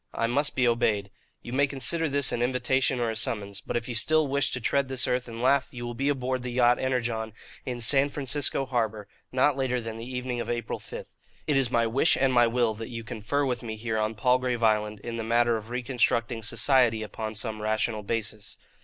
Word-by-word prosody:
I - - +1
must 140 +5 0
be 125 -2 +3
obeyed. 105 -4 +1 0.3
You 120 - -7
may 140 +2 +3
consider 140 +4 +1
this 140 -1 +3
an 120 - -1
invitation 130 +1 +1
or 115 -1 0
a - - -5
summons; 100 -3 -3
but 120 - -2
if 115 - -4
you 125 - -3
still 155 +7 +3
wish 140 +1 +1
to 130 - -2
tread 140 +3 +1
this 130 -1 -1
earth 125 0 0
and 115 0 -6
laugh, 140 +1 +3
you 120 -2 -7
will 120 - -4
be 135 +4 0
aboard 130 -2 -1
the 125 - -4
yacht 120 0 +3
Energon, 115 -4 -1 0.3
in 125 -1 -3
San 135 +4 +3
Francisco 140 -1 -1
harbour, 110 -5 -2 0.2
not 130 +2 +3
later 130 -2 0
than 115 -1 -6
the 115 +3 -7
evening 125 -1 -3
of - - -5
April 120 -2 -3
5. - - -8 0.4
It 150 - +1
is 135 -3 +3
my 115 -1 +2
wish 130 +8 +3
and 135 -1 +2
my 120 -1 +5
will 115 -1 +1
that 115 +3 -7
you 115 -2 -6
confer 120 +5 -2
with 125 -3 -1
me 110 -2 -5
here 110 0 -2
on 110 +1 -1
Palgrave 125 +1 +1
Island 105 -1 +1
in 115 +1 -5
the 115 - -3
matter 120 +1 +3
of 110 0 -6
reconstructing 120 -1 0
society 115 -1 +2
upon 110 +1 -5
some 110 0 -4
rational 110 0 0
basis. 105 -1 -4
120 Hz, 220 wpm, -27 LUFS, 115-130 Hz, 0.4 s, my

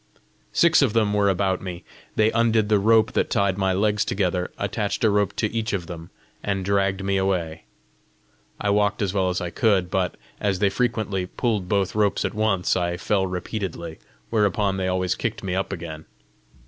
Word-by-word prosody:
Six 170 -2 +4
of 130 -7 +2
them 110 -3 +2
were 100 -1 +3
about 95 0 0
me. 90 -2 -6 0.3
They 110 +1 +3
undid 115 -2 +2
the 105 -1 +4
rope 110 +2 +4
that - - 0
tied 100 -2 +1
my 95 -1 +2
legs 105 +2 +1
together, 90 -2 -1
attached 100 +2 -2
a 110 - +4
rope 105 -1 +1
to 110 -1 -1
each 110 -2 -2
of 90 -4 -2
them, 85 -1 -8 0.3
and 95 -2 -2
dragged 100 -1 +1
me 100 0 +1
away. 90 -4 -1 0.9
I 105 - 0
walked 105 0 +1
as 95 -2 -1
well 95 -2 +1
as 90 - -1
I 90 -1 -3
could, 95 -2 +2
but, 95 -2 0 0.2
as 100 -2 0
they 100 +1 +2
frequently 105 -4 -1
pulled 105 -4 -2
both 100 -2 +1
ropes 105 -2 +1
at - - -2
once, 105 -4 +1
I 85 -1 -1
fell 95 -1 0
repeatedly, 90 -3 -5 0.3
whereupon 105 -2 +1
they 95 -1 -1
always 90 -1 0
kicked - - -4
me 95 - -2
up 95 +2 -1
again. 80 -4 -6
100 Hz, 185 wpm, -24 LUFS, 90-105 Hz, 0.9 s, Six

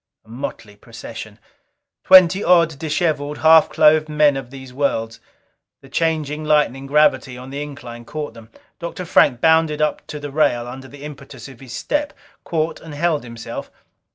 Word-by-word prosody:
Motley 115 -3 -7
procession! 100 - -10 0.7
Twenty 185 +1 +7
odd, 165 -4 +3
disheveled, 150 -2 -1
half 160 0 +6
clothed 155 0 +4
men 150 -1 +3
of 135 -3 -6
these 130 -1 -11
worlds. 115 -5 -2 0.6
The 135 - -16
changing, 155 0 -1
lightening 145 -3 +1
gravity 135 -3 +2
on 130 +1 -10
the 140 +1 -5
incline 125 -5 -9
caught 150 +4 -6
them. 115 -1 -14 0.3
Dr. 170 +1 -6
Frank 125 -7 +3
bounded 160 -2 +3
up 150 0 -1
to 150 - -7
the 145 -1 -7
rail 120 -5 +1
under 130 +2 -9
the 145 +1 -13
impetus 140 -4 -10
of 130 -3 -14
his 130 -3 -11
step; 295 - -2 0.3
caught 160 -1 -2
and 160 -2 -10
held 160 -2 0
himself. 115 -1 -8
145 Hz, 155 wpm, -20 LUFS, 130-155 Hz, 0.7 s, Twenty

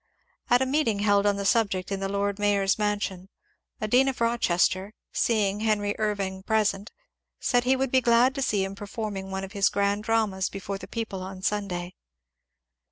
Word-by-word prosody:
At 245 +2 +5
a - - 0
meeting 260 -5 +1
held 205 0 +3
on 205 - +3
the 200 0 -4
subject 195 -3 +1
in 195 - -1
the 195 0 -2
Lord 200 0 -1
Mayor's 200 -1 +2
mansion, 205 -3 -2 0.5
a 215 - -2
dean 250 +5 +4
of 270 - -1
fiochester, 200 -4 +1 0.2
seeing 210 -3 +1
Henry 210 -2 +1
Irving 200 -3 -2
present, 210 0 0 0.5
said 245 -2 +1
he 260 +1 +4
would 265 -1 -1
be 260 - +4
glad 240 +2 +4
to 275 - -4
see 205 -6 +1
him 195 0 -4
performing 200 -1 -5
one 190 0 -4
of 190 - -7
his 200 -1 +2
grand 200 +1 0
dramas 215 -5 +1
before 195 0 -5
the - - -9
people 220 -5 -4
on 190 0 -8
Sunday. 185 -4 -2
205 Hz, 180 wpm, -26 LUFS, 195-225 Hz, 0.5 s, At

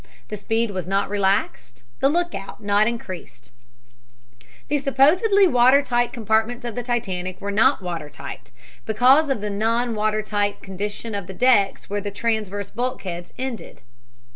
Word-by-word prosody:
The 210 - -4
speed 225 +2 -1
was 185 -3 -4
not 195 +1 0
relaxed, 190 -10 -1 0.2
the 275 - +4
lookout 340 - -2
was 215 - -14
not 205 +1 +3
increased. 180 - -7 1.2
The 295 - +1
supposedly 325 - +4
water 255 0 +5
tight 240 -3 0
compartments 225 +2 0
of 235 - -4
the 245 - -3
Titanic 185 -7 -3
were 200 - -4
not 225 +2 +3
water 165 -4 -5
tight, 140 -1 -9 0.4
because 255 +7 +4
of 265 -6 -1
the 210 0 -3
non 230 +4 0
water 215 0 0
tight 205 -1 -1
condition 205 +4 -5
of 200 -3 -4
the 190 - -8
decks 225 -5 +2
where 205 0 -2
the 205 - -4
transverse 205 -2 -2
bulkheads 190 -9 -4
ended. 255 -4 -6
215 Hz, 155 wpm, -22 LUFS, 195-245 Hz, 1.2 s, water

